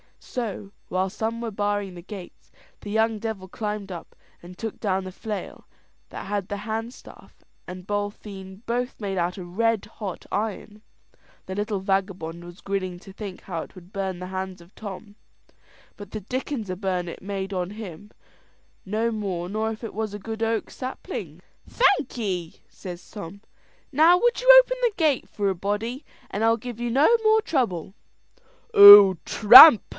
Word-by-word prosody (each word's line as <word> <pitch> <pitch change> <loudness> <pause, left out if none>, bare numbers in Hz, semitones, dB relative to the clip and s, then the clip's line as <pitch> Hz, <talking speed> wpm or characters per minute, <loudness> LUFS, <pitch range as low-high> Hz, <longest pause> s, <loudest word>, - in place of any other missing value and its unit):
So, 210 -5 -5 0.2
while 185 +1 -1
some 225 +3 -4
were 230 -1 -4
barring 205 -1 -2
the 175 - -10
gates, 190 0 -11 0.3
the 205 - -9
young 220 0 +1
devil 210 -4 -5
climbed 210 0 -5
up, 170 -2 -9 0.3
and 180 +1 -13
took 225 0 -6
down 190 -3 -1
the 185 - -7
flail 210 +2 -7 0.4
that - - -8
had 200 -1 -3
the 205 - -4
handstaff 225 +3 -7 0.4
and 180 0 -9
booltheen 205 -1 -5
both 245 +2 -3
made 195 -3 -4
out 175 +1 -1
of 180 0 -10
red 225 -2 +1
hot 200 -4 -8
iron. 210 0 -4 0.7
The 190 - -5
little 205 0 -2
vagabond 190 -4 -2
was 175 +1 -12
grinning 185 -2 -3
to 195 +1 -14
think 195 -2 -8
how 170 -4 -5
it - - -12
would 180 0 -14
burn 190 -3 -4
the 180 - -6
hands 190 -1 -5
o' 170 - -17
Tom, 205 0 -9 0.8
but 205 - -11
the 215 - -5
dickens 250 0 -4
a 185 - -2
burn 185 -2 -2
it 170 - -8
made 195 0 -5
on 180 0 -3
him, 205 -2 -9 0.7
no 220 +4 -1
more 190 -5 -4
nor 220 +2 -2
if 220 +1 -9
it 225 - -6
was 215 -1 -4
a 205 - -6
good 220 +2 -7
oak 225 -1 -1
sapling. 255 0 -7 0.3
"Thankee," 220 - 0
says 180 -2 -10
Tom. 200 -1 -9 0.5
"Now 320 +5 +6
would 480 +3 +2
you - - -6 0.2
open - - -4
the 480 -3 +2
gate 310 -6 +1
for 200 -1 -1
a 190 - -1
body, 210 - -3 0.2
and 210 - -3
I'll 225 0 +3
give 235 0 -8
you 240 0 -2
no 290 - +4
more 435 0 +4
trouble." 220 - -2 0.8
"Oh, 200 -1 +11
tramp!" 235 +4 +10
205 Hz, 170 wpm, -24 LUFS, 190-225 Hz, 0.8 s, Oh